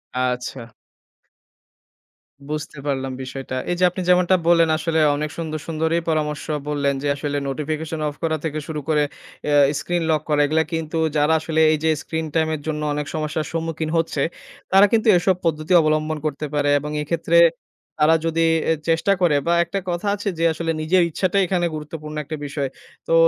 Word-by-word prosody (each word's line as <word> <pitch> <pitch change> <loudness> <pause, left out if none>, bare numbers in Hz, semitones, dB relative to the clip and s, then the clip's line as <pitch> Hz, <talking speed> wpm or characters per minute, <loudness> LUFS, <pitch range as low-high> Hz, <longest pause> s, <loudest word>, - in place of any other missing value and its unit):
আচ্ছা। 125 -1 -2 1.8
বুঝতে 150 0 -5
পারলাম 135 -1 -1
বিষয়টা। 130 0 -6 0.2
এই - - +1
যে - - +2
আপনি 185 +1 -5
যেমনটা 180 +1 +5
বললেন 170 -1 +5
আসলে 160 0 0 0.2
অনেক 150 +1 -2
সুন্দর, 155 -2 -4
সুন্দরই 160 +1 0
পরামর্শ 150 -1 -1 0.2
বললেন, 140 -1 +1
যে - - 0
আসলে 145 0 -3
নোটিফিকেশন 155 +3 -3
অফ 145 - -5
করা 160 -1 +1
থেকে 155 -1 -2
শুরু 155 -2 -4
করে 150 -1 +3 0.5
আ - - +3 0.3
স্ক্রিন 175 +1 -1
লক 155 -2 +2
করা। 150 -1 +3
এগুলা 160 +2 +2
কিন্তু 160 0 -2 0.2
যারা 150 +2 +3
আসলে 160 0 0
এই 155 - +2
যে 160 - +3
স্ক্রিন 160 0 -3
টাইম 160 -1 +3
এর 150 - -8
জন্য 150 -1 -2
অনেক 150 0 -2
সমস্যার 155 0 -2
সম্মুখীন 165 -1 -2
হচ্ছে, 160 -3 0 0.5
তারা 195 +2 +7
কিন্তু 225 0 +2
এসব 185 +1 +2
পদ্ধতি 155 +2 0
অবলম্বন 155 0 0
করতে 150 0 -2
পারে। 145 -1 +1
এবং 150 +1 -6
এক্ষেত্রে, 170 +2 +1 0.6
তারা 160 +2 +6
যদি 165 0 +1 0.4
চেষ্টা 165 +4 +3
করে 165 -5 +4
বা 170 - +3
একটা 195 +3 -3
কথা 175 +4 -2
আছে 205 0 -3
যে, 165 - 0
আসলে 165 0 -2
নিজের 175 +4 +3
ইচ্ছাটাই 185 +4 +1
এখানে 175 -1 +1
গুরুত্বপূর্ণ 155 0 -7
একটা 155 +2 -5
বিষয়। 140 -1 -3 0.4
তো - - +1
155 Hz, 175 wpm, -22 LUFS, 150-165 Hz, 1.8 s, তারা